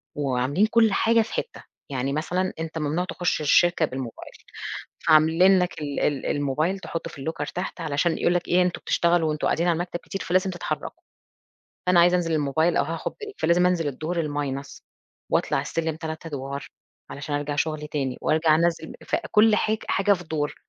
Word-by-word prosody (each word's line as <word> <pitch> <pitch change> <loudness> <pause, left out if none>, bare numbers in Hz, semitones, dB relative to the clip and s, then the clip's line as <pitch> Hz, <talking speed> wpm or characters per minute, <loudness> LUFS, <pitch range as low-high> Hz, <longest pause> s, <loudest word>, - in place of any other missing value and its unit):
وعاملين 140 +6 +1
كل 225 -2 +3
حاجة 230 +2 +4
في 220 - -5
حتّة. - - -4 0.3
يعني 135 0 -2
مثلًا 180 +5 -1
أنت 160 0 -4
ممنوع 160 +4 -1
تُخُش 175 -4 -1
الشركة 170 +2 +4
بالموبايل. 130 -4 -7 0.8
فعاملين 165 +5 +6
لك 180 -3 -1
ال 145 -1 -3
ال 145 -2 0
الموبايل 145 +6 0
تحطه 165 -2 -5
في - - -13
الlocker 155 -2 -3
تحت 180 0 -5
علشان 160 +2 0
يقول 175 - +2
لك 175 - -1
إيه 180 +1 +4
أنتم 180 -1 -1
بتشتغلوا 170 -1 +2
وأنتم 150 0 -1
قاعدين 170 +2 +1
على - - +4
المكتب 175 0 -4
كتير 195 - -6
فلازم 185 +2 +1
تتحركوا. 175 - -5 0.8
فأنا 180 -1 +5
عايزة 175 +1 +5
أنزل 170 -2 0
للموبايل 155 +3 +1
أو - - +3
هاخد 165 +2 -4
break 425 -1 -9
فلازم 175 +1 +3
أنزِل 175 -4 +1
الدور 155 +6 -3
الminus، 140 -2 -4 0.5
وأطلَع - - +1
السِلِّم 160 -1 -2
3 160 0 -6
أدور 140 -2 -5 0.4
علشان 145 +1 -4
أرجع 145 0 -2
شغلي 155 0 -1
تاني، 135 -4 -2
وأرجع 155 0 +3
أنَزِّل 165 -1 0
فكل 215 0 +3
حاج 215 +1 +1
حاجة 200 +1 +3
في 180 -2 -5
دور. 150 -2 -2
160 Hz, 175 wpm, -25 LUFS, 145-180 Hz, 0.8 s, فعاملين